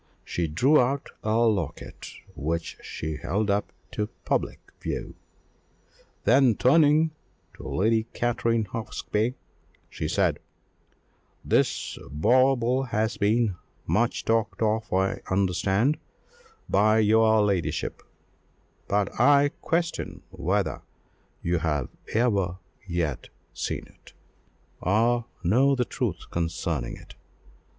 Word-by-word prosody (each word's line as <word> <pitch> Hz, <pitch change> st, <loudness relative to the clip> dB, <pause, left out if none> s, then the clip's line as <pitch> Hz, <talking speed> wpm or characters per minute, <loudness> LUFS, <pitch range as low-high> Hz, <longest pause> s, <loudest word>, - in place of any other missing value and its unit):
She 85 Hz, -1 st, -1 dB
drew 130 Hz, -, +4 dB
out 135 Hz, +3 st, -1 dB
a 110 Hz, +1 st, +1 dB
locket, 110 Hz, -9 st, -1 dB, 0.3 s
which 80 Hz, +2 st, -3 dB
she 80 Hz, -1 st, -5 dB
held 100 Hz, +7 st, -1 dB
up 100 Hz, +1 st, -1 dB, 0.2 s
to 105 Hz, -, -2 dB, 0.2 s
public -, -, -1 dB, 0.2 s
view; -, -, -4 dB, 1.1 s
then, 130 Hz, -5 st, +5 dB
turning 155 Hz, +5 st, +4 dB, 0.4 s
to -, -, -10 dB
Lady 110 Hz, +3 st, +1 dB
Katrine 115 Hz, -2 st, 0 dB
Hawksby, 110 Hz, +2 st, -2 dB, 0.6 s
she -, -, -3 dB
said -, -, +1 dB, 1.1 s
"This -, -, +1 dB
bauble 125 Hz, -, +3 dB
has 110 Hz, 0 st, 0 dB
been 105 Hz, -1 st, +2 dB, 0.3 s
much 120 Hz, +2 st, 0 dB
talked 115 Hz, 0 st, +1 dB
of, 110 Hz, 0 st, 0 dB
I 95 Hz, +1 st, +1 dB
understand, 95 Hz, -, +1 dB, 0.7 s
by 110 Hz, +1 st, +4 dB
your 110 Hz, 0 st, +4 dB
ladyship, 100 Hz, -4 st, -1 dB, 0.9 s
but 100 Hz, +1 st, 0 dB
I 140 Hz, +3 st, +6 dB
question 170 Hz, 0 st, -2 dB
whether -, -, -1 dB, 0.6 s
you 85 Hz, 0 st, +1 dB
have 75 Hz, -5 st, -1 dB, 0.3 s
ever 100 Hz, -7 st, +1 dB, 0.3 s
yet 85 Hz, -6 st, -2 dB, 0.2 s
seen -, -, -3 dB
it, -, -, -20 dB, 0.7 s
or 115 Hz, +5 st, +2 dB, 0.2 s
know 130 Hz, +10 st, +4 dB
the 125 Hz, -1 st, 0 dB
truth -, -, -4 dB
concerning 80 Hz, -5 st, -2 dB
it. -, -, -14 dB
110 Hz, 105 wpm, -26 LUFS, 95-120 Hz, 1.1 s, I